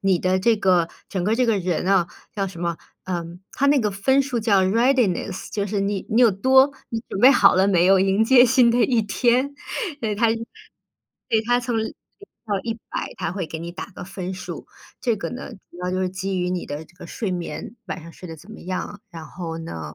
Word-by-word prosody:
你 190 -3 +2
的 185 0 +1
这 225 +4 +3
个， 180 -4 +3 0.2
整 190 -3 -2
个 210 +5 +2
这 250 +1 +2
个 225 -3 +2
人 180 -1 -1
哦， 190 -3 +4 0.3
叫 195 -2 -1
什 170 -2 -10
么， 170 -1 -1 0.3
嗯， 175 -1 -5
它 280 - +1
那 285 0 +5
个 210 - 0
分 265 +8 +2
数 265 -3 -2
叫 205 -4 +3
readiness， 215 -3 +1
就 205 -1 -1
是 205 0 -2
你 200 -1 -1
你 225 - +3
有 235 -3 +7
多 265 +7 +4 0.2
你 225 - -3
准 195 - -4
备 260 +4 +9
好 200 -8 +6
了 190 +1 +4
没 180 -2 +4
有， 195 0 +6
迎 195 +3 +3
接 250 +1 +7
新 250 -1 +5
的 235 - +1
一 240 -3 +2
天。 245 +6 +1 0.5
嗯， 215 -2 -1
它 230 +2 +3 1.0
对， 220 - +3
它 245 +1 +3
从 240 -2 -1
0 220 - -3 0.5
到 205 -2 0
100， 230 -1 -5
它 - - -3
会 185 -3 -3
给 160 - -6
你 170 - -6
打 180 - -6
个 200 - -11
分 190 -1 -6
数， 185 - -7 0.3
这 235 -3 +1
个 200 - -5
呢， 250 +1 -7 0.2
主 175 - -14
要 180 - -1
就 185 - -1
是 185 - 0
基 190 0 -3
于 180 0 -1
你 180 -1 -3
的 145 +2 -6
这 175 - -24
个 - - -10
睡 210 -5 -4
眠， 180 +6 -5
晚 175 - -5
上 165 +1 -11
睡 180 - -11
得 160 - -8
怎 180 +8 -15
么 - - -10
样。 185 +3 -5
然 165 -2 -9
后 165 +1 -6
呢， 80 - -7
195 Hz, 260 characters per minute, -23 LUFS, 180-230 Hz, 1.0 s, 备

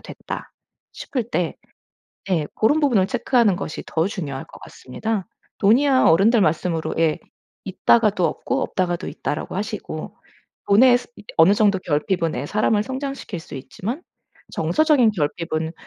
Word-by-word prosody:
됐다 - - -8 0.4
싶을 250 -5 -4
때 175 -3 -1 0.7
네 160 -5 +1
고런 290 +9 +2
부분을 230 -10 +3
체크하는 220 -2 +2
것이 170 -4 -5
더 165 +2 0
중요할 145 -10 -5
것 - - -15
같습니다. 205 - -4 0.3
돈이야 260 +6 +4
어른들 205 +7 +5
말씀으로 165 0 0
예 160 -2 +2 0.5
"있다가도 195 -1 +2
없고 265 - -2
없다가도 175 -2 -2
있다."라고 155 +4 -4
하시고 205 -6 -5 0.5
돈의 245 +4 +6
스 - - -13 0.3
어느 170 +5 +7
정도 205 -3 +3
결핍은 165 +1 -1
애 135 - -3
사람을 210 +2 +1
성장시킬 265 - -5
수 160 - -12
있지만 215 - -6 0.5
정서적인 295 -8 +3
결핍은 160 -1 -2
195 Hz, 315 characters per minute, -22 LUFS, 165-235 Hz, 0.7 s, 어느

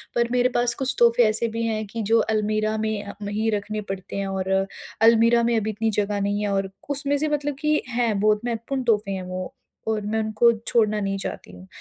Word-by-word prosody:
पर 235 0 +2
मेरे 250 0 +3
पास 240 0 +3
कुछ 265 +1 +2
तोहफ़े 235 0 +5
ऐसे 225 +2 0
भी 230 - -1
हैं 215 -1 -2
कि 225 +3 -5
जो 230 - +6
अलमीरा 215 0 0
में 215 -1 -2
अ, 200 - -8
मही 210 +2 -1
रखने 210 +1 -4
पड़ते 190 -1 -6
हैं 200 0 -2
और 190 -1 -3 0.6
अलमीरा 230 +1 +5
में 235 0 +2
अभी 220 0 -1
इतनी 220 +1 -1
जगह 205 0 -2
नहीं 205 +1 0
है। 205 - 0
और 195 0 0 0.2
उसमें 285 0 0
से 305 +2 0
मतलब 290 -1 -1
कि 305 0 +2
हैं 235 -4 0
बहुत 210 +1 +3
महत्वपूर्ण 240 +3 -2
तोहफ़े 210 -4 +1
हैं 190 -1 -4
वो 185 0 -6 0.3
और 220 -1 0
मैं 220 +2 -1
उनको 220 +2 +3 0.2
छोड़ना 215 -2 +2
नहीं 195 0 -1
चाहती 195 - -6
हूँ। 90 +1 -13
220 Hz, 220 wpm, -24 LUFS, 205-235 Hz, 0.6 s, जो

